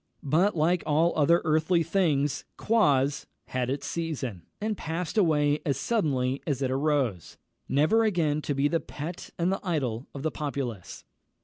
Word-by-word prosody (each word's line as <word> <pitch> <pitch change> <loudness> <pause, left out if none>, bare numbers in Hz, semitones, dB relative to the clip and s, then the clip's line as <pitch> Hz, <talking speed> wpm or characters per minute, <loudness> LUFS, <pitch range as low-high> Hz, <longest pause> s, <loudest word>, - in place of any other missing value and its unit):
But, 175 +9 +2
like 170 +3 +2
all 160 +3 +3
other 165 +3 +3
earthly 160 +2 +2
things, 155 -5 +1
Quoz 145 -11 +2 0.2
had 125 -1 -1
its 135 +1 -3
season, 135 - -4
and 215 0 -1
passed 165 +2 -4
away 150 -7 +3
as 140 - 0
suddenly 140 - 0
as 140 -3 -1
it 130 - 0
arose, 135 - 0 0.3
never 160 +12 +3
again 165 -8 +1
to 145 - -2
be 140 +2 +2
the 165 +2 +1
pet 160 +4 -7
and 175 +2 +1
the 195 - -1
idol 135 -9 -2
of 140 - -6
the 160 - 0
populace. 135 - -5
150 Hz, 155 wpm, -27 LUFS, 135-170 Hz, 0.3 s, all